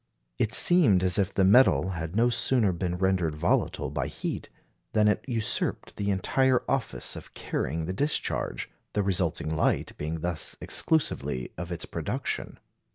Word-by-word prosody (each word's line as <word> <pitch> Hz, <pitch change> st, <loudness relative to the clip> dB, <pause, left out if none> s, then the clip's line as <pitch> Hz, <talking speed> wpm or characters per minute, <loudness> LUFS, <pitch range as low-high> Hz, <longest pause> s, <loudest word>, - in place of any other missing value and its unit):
It 110 Hz, -, +1 dB
seemed 120 Hz, -, +5 dB
as 90 Hz, +1 st, +4 dB
if 100 Hz, 0 st, +1 dB
the 95 Hz, -, +1 dB
metal 95 Hz, -, +5 dB
had 85 Hz, 0 st, -5 dB
no 120 Hz, +2 st, +3 dB
sooner 120 Hz, -3 st, +2 dB
been 90 Hz, 0 st, -3 dB
rendered 90 Hz, -4 st, +1 dB
volatile 75 Hz, -, 0 dB
by -, -, -2 dB
heat, -, -, -5 dB, 0.4 s
than 105 Hz, -1 st, +4 dB
it 105 Hz, -, +1 dB
usurped 115 Hz, -4 st, -2 dB
the 100 Hz, 0 st, -1 dB
entire 125 Hz, +7 st, +2 dB
office 115 Hz, -, -2 dB
of -, -, -11 dB
carrying 80 Hz, +4 st, -3 dB
the 90 Hz, -, -3 dB
discharge, 145 Hz, +9 st, -1 dB, 0.3 s
the 105 Hz, -, +1 dB
resulting 85 Hz, -4 st, -1 dB
light 80 Hz, -, 0 dB
being 80 Hz, +2 st, -4 dB
thus 85 Hz, -2 st, -4 dB
exclusively 145 Hz, -, 0 dB
of -, -, -6 dB
its -, -, -4 dB
production. -, -, -3 dB
95 Hz, 155 wpm, -27 LUFS, 85-115 Hz, 0.4 s, seemed